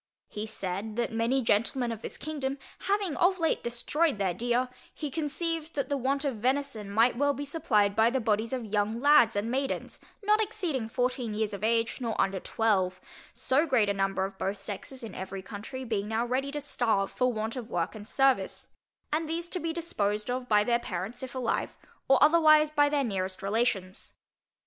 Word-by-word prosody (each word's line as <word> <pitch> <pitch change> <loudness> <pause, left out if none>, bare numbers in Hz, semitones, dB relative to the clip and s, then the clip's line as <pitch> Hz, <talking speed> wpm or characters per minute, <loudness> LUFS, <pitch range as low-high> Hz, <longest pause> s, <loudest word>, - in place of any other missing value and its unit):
He 210 +1 -5
said, 200 +1 -4
that 240 0 -1
many 230 +4 +1
gentlemen 230 +3 +1
of 225 -1 -6
this - - -6
kingdom, 280 -3 -3 0.3
having 395 -6 +1
of 370 +2 +3
late 325 -2 0
destroyed 260 +5 0
their 190 -3 0
deer, 240 +4 0 0.3
he 300 -3 -4
conceived 325 +2 -3
that 280 0 -1
the 285 - +1
want 275 +2 0
of 265 -5 -1
venison 250 -3 -1
might 230 +4 +4
be 240 - -8
well 285 0 +2
supplied 215 -10 +1
by 225 +1 +5
the 265 +2 0
bodies 220 -1 0
of 255 -3 -2
young 210 +2 0
lads 285 -5 +6
and 210 +3 -1
maidens, 270 +1 -2 0.2
not 425 +1 +4
exceeding 355 - -2
fourteen 250 -2 -1
years 215 -1 -1
of 200 0 -6
age, 230 +3 +1
nor 230 -3 -2
under 195 -1 +1
twelve; 185 -4 +1 0.4
so 265 +5 +2
great 230 -7 +3
a - - +2
number 195 -1 0
of 195 0 -8
both 195 +2 -1
sexes 220 +6 -7
in 225 - -7
every 190 0 -6
county 220 +7 -7
being 210 -3 -1
now 225 +2 0
ready 260 +3 -1
to 295 0 -3
starve 225 -8 0
for 250 0 +1
want 220 +1 -3
of 245 -3 -6
work 175 -4 -1
and 210 -1 -9
service: 265 -8 +1 0.4
and 315 0 0
these 335 +1 -2
to 365 - -3
be 330 -1 -2
disposed 215 -11 -1
of 250 0 -3
by 210 -1 +5
their 235 +2 +2
parents 200 +4 -5
if 260 -1 -7
alive, 250 -3 -1 0.3
or 270 - +6
otherwise 310 -1 +6
by 290 -1 +4
their 290 -1 +1
nearest 190 -5 -3
relations. 200 -3 -1
240 Hz, 195 wpm, -29 LUFS, 210-280 Hz, 0.4 s, lads